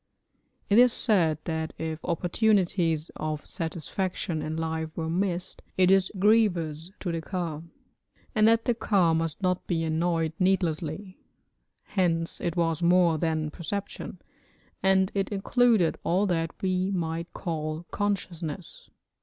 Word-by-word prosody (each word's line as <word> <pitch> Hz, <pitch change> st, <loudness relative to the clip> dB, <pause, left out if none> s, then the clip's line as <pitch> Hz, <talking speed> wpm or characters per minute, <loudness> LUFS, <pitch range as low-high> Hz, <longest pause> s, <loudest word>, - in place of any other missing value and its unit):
It 205 Hz, +3 st, +5 dB
is 250 Hz, 0 st, +7 dB
said 175 Hz, -, +2 dB
that 160 Hz, -1 st, -3 dB
if 160 Hz, 0 st, -4 dB
opportunities 175 Hz, -3 st, +1 dB
of 155 Hz, -1 st, -3 dB
satisfaction 170 Hz, +1 st, -3 dB
in 155 Hz, +1 st, -3 dB
life 160 Hz, 0 st, -2 dB
were 160 Hz, -1 st, -2 dB
missed 180 Hz, 0 st, -2 dB, 0.2 s
it 185 Hz, 0 st, +5 dB
is 195 Hz, -1 st, +4 dB
grievous 180 Hz, -6 st, +2 dB
to 180 Hz, -, -2 dB
the 165 Hz, -1 st, -2 dB
ka, 165 Hz, -4 st, -3 dB, 0.7 s
and 215 Hz, -2 st, +4 dB
that 230 Hz, 0 st, +4 dB
the 245 Hz, -, +3 dB
ka 195 Hz, -7 st, +2 dB
must 165 Hz, +3 st, -2 dB
not 180 Hz, 0 st, 0 dB
be 165 Hz, -2 st, 0 dB
annoyed 165 Hz, 0 st, 0 dB
needlessly; 185 Hz, 0 st, 0 dB, 0.6 s
hence 165 Hz, -4 st, 0 dB
it 170 Hz, -, -2 dB
was 165 Hz, -1 st, 0 dB
more 170 Hz, -2 st, +4 dB
than 155 Hz, -2 st, -1 dB
perception, 200 Hz, +6 st, -5 dB, 0.6 s
and 190 Hz, 0 st, +3 dB
it 195 Hz, -1 st, -1 dB
included 215 Hz, -2 st, +2 dB
all 185 Hz, +4 st, +2 dB
that 165 Hz, -4 st, -1 dB
we 185 Hz, 0 st, +1 dB
might 170 Hz, -2 st, -2 dB
call 155 Hz, -1 st, -4 dB
consciousness. 185 Hz, -5 st, -3 dB
175 Hz, 130 wpm, -27 LUFS, 160-190 Hz, 0.7 s, is